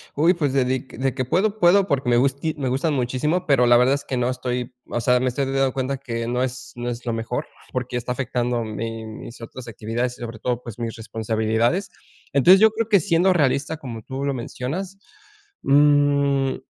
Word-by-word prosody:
Uy, 165 +5 +4
pues 150 -6 -1
de 135 -1 +2
dic 130 +1 -3
de 130 +1 0
que 130 - -1
puedo 195 - +1
puedo 195 +1 +5
porque 140 -4 0
me 120 - +4
gusti 140 +5 +1
me 135 -3 -2
gustan 135 +5 0
muchísimo, 140 +7 0
pero 135 -5 +4
la 120 0 +6
verdad 125 +2 +4
es 140 - -5
que 130 - -3
no 125 0 +1
estoy 125 -1 -3 0.2
o - - -1
sea, 125 +1 +3
me 130 - +1
estoy 135 +3 -1
dando 135 0 +1
cuenta 130 +1 -2
que 115 -3 -4
no 125 +1 0
es 130 0 -5
no 120 0 -4
es 120 +1 -6
lo 120 - -1
mejor 115 +2 -3 0.2
porque 125 -1 -3
está 120 0 -3
afectando 125 -2 -1
mi 115 +1 -5
mis 110 +2 -9
otras 120 +1 -9
actividades 115 +3 -3
y - - -16
sobre 115 -2 -6
todo, 125 +1 -2
pues 120 -2 -9
mis 115 -1 -3
responsabilidades. 110 - -1 0.4
Entonces 175 +8 +7
yo 220 +1 +6
creo 225 +1 -2
que 205 -3 +6
siendo 175 +2 +3
realista 145 -2 +1
como 120 -7 -7
tú 135 +5 -5
lo 140 - 0
mencionas, 140 +10 -5 0.6
mm, 140 -1 +3
130 Hz, 210 wpm, -23 LUFS, 120-145 Hz, 0.6 s, Entonces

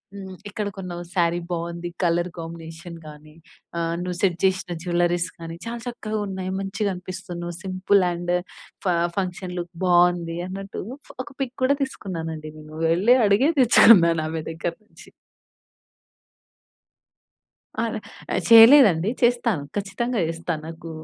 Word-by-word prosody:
హ్మ్. 190 -2 -8
ఎక్కడ 210 0 -4
కొన్నావు 175 -2 -6
శారీ 170 -1 +2
బావుంది 170 0 -4
కలర్ 175 +1 +1
కాంబినేషన్ 165 +1 -8
గానీ, 150 0 -13 0.4
ఆహ్, 165 0 -1
నువ్వు 180 -1 -4
సెట్ 180 -4 +2
జేసిన 185 -2 0
జ్యువెల్లరీస్ 175 -1 +1
కానీ, 165 0 -7
చాలా 235 +1 -4
చక్కగా 220 -3 -4
ఉన్నాయి 190 -1 -4
మంచిగా 200 +1 -2
అనిపిస్తున్నావు 180 -1 -7
సింపుల్ 190 +1 +2
అండ్ 175 0 -2 0.5
ఫ - - 0 0.3
ఫంక్షన్‌ 180 -1 -3
లుక్ 175 0 -6
బావుంది 175 -1 +3
అన్నట్టు. 195 +1 -6 0.4
ఒక - - -12
పిక్ 260 -1 -3
కూడా 275 +2 +4
తీసుకున్నానండి 165 - -5
నేను. 155 0 -12 0.2
వెళ్ళి 200 +9 +5
అడిగే 205 +9 +4
తెచ్చుకున్నాను 170 -9 +6
ఆమె 160 0 -3
దగ్గర 165 +1 -4
నుంచి. - - -16 2.7
ఆల - - -1 0.4
ఆహ్, - - +1
చేయలేదండి, 225 - +8
చేస్తాను, 235 - +2
ఖచ్చితంగా 205 +4 -2
చేస్తా. 165 +1 -3
నాకూ 165 +1 -8
180 Hz, 125 wpm, -23 LUFS, 170-200 Hz, 2.7 s, చేయలేదండి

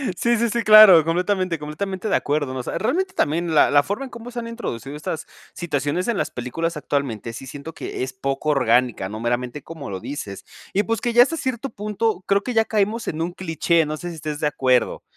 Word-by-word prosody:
Sí, 235 +4 +2
sí, 235 +1 +1
sí, 235 - 0
claro, 215 -6 +9
completamente, 180 +1 0
completamente 185 +7 -4
de - - +2
acuerdo. 145 -2 -1
O 130 - -2
sea, - - -4
realmente 370 - -1
también 165 +2 0
la 150 - +5
la 145 0 +6
forma 205 - -4
en 260 - -11
cómo 235 +1 -9
se 245 - -11
han 230 - -5
introducido 145 - -6
estas 150 +1 -5 0.3
situaciones 150 +1 -2
en 235 -3 0
las - - -1
películas 160 +7 -3
actualmente 130 -7 -3
sí, 130 +3 -8
siento 145 +4 -8
que - - -5
es 130 - -5
poco 135 +3 -2
orgánica, 125 -7 +2
no 110 +2 -6
meramente 120 +4 -2
como 160 -5 -8
lo 95 -1 -4
dices 100 -5 -7 0.3
y 205 - +2
pues 225 0 -2
que 240 - -1
ya 240 +1 +8
hasta 330 +6 -3
cierto 260 -1 -3
punto, 210 -1 -2
creo 200 0 +3
que 250 - -3
ya 225 -1 +4
caemos 220 +2 0
en 160 - -3
un 175 - -3
cliché. 170 -2 +1
No 155 - -3
sé 175 +2 -6
si 170 - -7
estés 150 -1 -5
de 150 - +1
acuerdo. 130 -4 +1
165 Hz, 225 wpm, -22 LUFS, 140-215 Hz, 0.3 s, claro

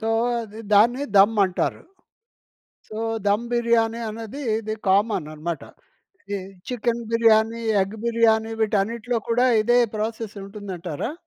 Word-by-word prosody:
So, 225 - -2 0.3
అది 220 0 -9
దాన్ని 240 +7 +4
ధమ్ 205 +3 +6
అంటారు. 185 -1 -2 1.1
సో, 215 - -7 0.3
ధమ్ 205 +3 +2
బిర్యానీ 235 -1 +2
అన్నది 225 +5 -7 0.2
ఇది 215 -1 -4
కామన‌న్నమాట. 170 -6 0 0.7
ఇది 200 - -1 0.3
చికెన్ 235 -1 -1
బిర్యానీ, 230 0 +3 0.2
ఎగ్ 195 +3 -5
బిర్యానీ 225 -1 +2
వీటన్నిటిలో 220 +3 0
కూడా 245 +2 +3 0.2
ఇదే 240 +3 +3 0.2
ప్రాసెస్ 220 0 -4
ఉంటుందంటారా? 195 - -6
220 Hz, 110 wpm, -23 LUFS, 205-230 Hz, 1.1 s, ధమ్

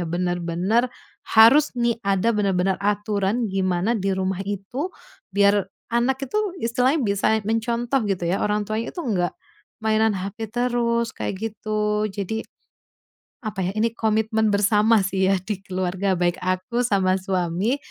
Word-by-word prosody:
ya, 175 - -3
bener-bener 175 +6 0 0.4
harus 235 +7 +7
nih, 235 -1 0
ada 200 +2 +1
benar-benar 195 -3 +1
aturan 205 +2 0
gimana 190 0 0
di 200 -4 -1
rumah 190 0 -1
itu, 205 - -4 0.4
biar 200 0 +3 0.2
anak 260 +3 +1
itu 275 +11 -2 0.3
istilahnya 250 +5 +2
bisa 200 -1 +1 0.2
mencontoh 235 +4 0
gitu 185 -3 -1
ya, 175 +3 0
orang 210 0 0
tuanya 215 +2 -3
itu - - -2
nggak 180 -7 0 0.5
mainan 220 -1 +2
HP 200 +4 -5
terus, 235 -1 0
kayak 195 - -4 0.2
gitu. 210 0 -1
Jadi, 205 +2 -3 1.0
apa 210 -2 -4
ya? - - -2
Ini 225 +1 +1
komitmen 220 -1 +1
bersama 210 +1 +3
sih 190 0 +1
ya, 195 - +3
di 205 -2 -3
keluarga 185 0 -1
baik 175 0 0
aku 185 +6 -1
sama 195 -5 +2
suami, 185 +5 0
210 Hz, 140 wpm, -23 LUFS, 190-230 Hz, 1.0 s, harus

